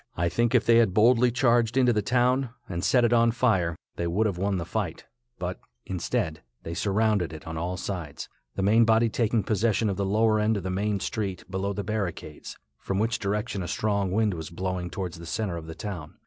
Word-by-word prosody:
I 85 +1 +1
think 120 +7 +1
if 125 - +4
they 115 0 +6
had 110 -6 +3
boldly 120 +3 +5
charged 120 -1 +2
into 125 -2 +4
the 105 - +1
town 125 +3 +2 0.2
and 85 -1 -4
set 125 -2 +4
it 120 - +2
on 115 0 +5
fire, 105 -9 +1 0.2
they 85 - -1
would 100 +6 +1
have 95 -5 -1
won 100 0 0
the 85 - -3
fight; - - -3 0.3
but, - - -4 0.3
instead, 80 -3 -2 0.2
they 80 - -5
surrounded 100 -1 +1
it 80 -1 -9
on 80 - -6
all 90 +3 -3
sides, 90 -6 -5 0.3
the - - -1
main 110 +4 +5
body 115 +1 +4
taking 110 -1 +1
possession 110 +1 +1
of 95 - -4
the 100 - 0
lower 110 +2 +2
end 105 0 +2
of 100 - -5
the 95 - -2
main 100 +2 0
street 95 -3 -3
below 95 +1 -1
the 100 0 -3
barricades, 95 -8 -4 0.2
from 95 - -3
which 110 +2 0
direction 105 0 -2
a 90 - -4
strong 100 0 0
wind 105 0 +2
was 80 -2 -6
blowing 90 0 -3
towards 90 -2 -5
the 85 - -9
center 105 -1 -2
of 80 -1 -7
the 80 - -7
town. 90 -8 -6
100 Hz, 220 wpm, -26 LUFS, 90-115 Hz, 0.3 s, they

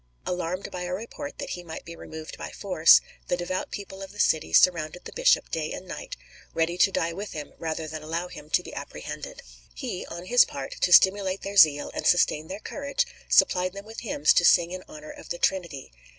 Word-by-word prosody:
Alarmed 180 +1 -3
by 180 - -5
a 180 0 -3
report 235 +7 -7
that - - -6
he 175 - -5
might 160 -2 -8
be 170 - -9
removed 160 -1 -9
by - - -7
force, 180 -5 +5 0.3
the 175 - 0
devout 180 +1 -3
people 195 -1 -8
of 195 - -8
the 205 - -14
city 155 - +2
surrounded 165 - +3
the - - -7
bishop - - +3
day - - -2
and - - -7
night, - - -7 0.4
ready 165 +1 +1
to 190 +2 +4
die 170 -2 -1
with 200 +4 -6
him 150 -2 -7
rather 160 -1 -3
than 155 0 -6
allow 165 +3 -3
him 150 -3 -11
to - - +2
be - - -10
apprehended. - - -7 0.3
He, 120 - -5
on 175 +1 -8
his 245 +5 +6
part, 135 -1 -7
to 180 - +2
stimulate 190 +1 +5
their 200 +1 -5
zeal 150 -6 +5
and - - -2
sustain 160 -3 +3
their 195 +4 -6
courage, 285 - -2 0.2
supplied 185 0 +3
them 200 +1 -9
with 225 +1 -8
hymns 150 -10 +2
to 175 - +3
sing 170 0 +5
in 185 0 -5
honour 305 0 -10
of 295 0 -12
the 175 - -3
Trinity. 170 - -1
180 Hz, 215 wpm, -26 LUFS, 160-200 Hz, 0.4 s, his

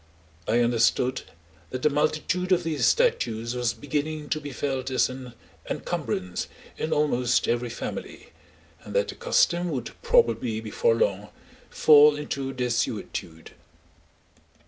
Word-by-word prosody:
I 120 - +3
understood 120 +2 +2 0.5
that 130 0 -5
the 150 - +5
multitude 155 +5 0
of 180 -1 +3
these 160 -3 +1
statues 120 - +1
was 120 -1 0
beginning 150 +4 -3
to 155 - -1
be 145 -1 -7
felt 135 -1 -3
as 130 - +2
an 130 -2 -9 0.4
encumbrance 90 -1 -3 0.3
in 160 - -3
almost 125 -5 +1
every 120 +1 0
family, 120 - -7 0.5
and - - -9
that - - +2
the - - -4
custom 180 - +1
would 130 -7 -4
probably 475 - +2
before 110 +1 +1
long 105 -2 0 0.4
fall 150 -1 +6
into 140 -2 -4
desuetude. 115 -9 -3
130 Hz, 125 wpm, -26 LUFS, 120-155 Hz, 0.5 s, fall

